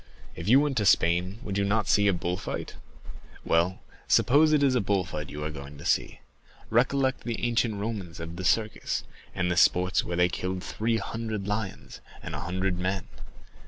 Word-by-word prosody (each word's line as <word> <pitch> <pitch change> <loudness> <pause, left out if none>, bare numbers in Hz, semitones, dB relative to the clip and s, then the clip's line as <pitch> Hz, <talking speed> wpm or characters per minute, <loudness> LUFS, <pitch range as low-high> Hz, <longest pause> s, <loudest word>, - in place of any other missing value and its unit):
If 85 - -6
you 125 +5 +7
went 145 -2 0
to 105 - +1
Spain, 90 +4 +3
would 100 -1 -2
you - - +2
not 105 +1 +1
see 105 0 +4
the 100 - +4
bull 90 0 -2
fights? - - -5 0.7
Well, 85 +3 +1 0.3
suppose 150 +4 +5
it 150 -2 +3
is 135 -2 +4
a 125 - +2
bull 100 -2 +1
fight 75 -3 -6
you 75 +1 -6
are 75 - -3
going 70 -1 -9
to 70 - -11
see? - - 0 0.5
Recollect 130 +3 +2
the 120 0 -3
ancient 115 -2 +1
Romans 100 -5 -5
of 85 0 -6
the 95 - -6
Circus, 105 +5 0 0.3
and 90 0 0
the - - +1
sports 90 +1 +4
where 85 0 -4
they 90 0 +5
killed 90 +1 -3
three 115 +1 -1
hundred 110 -3 -4
lions 105 -2 -4 0.2
and - - -6
a - - -3
hundred 95 0 -2
men. 95 0 -2
95 Hz, 195 wpm, -27 LUFS, 90-115 Hz, 0.7 s, you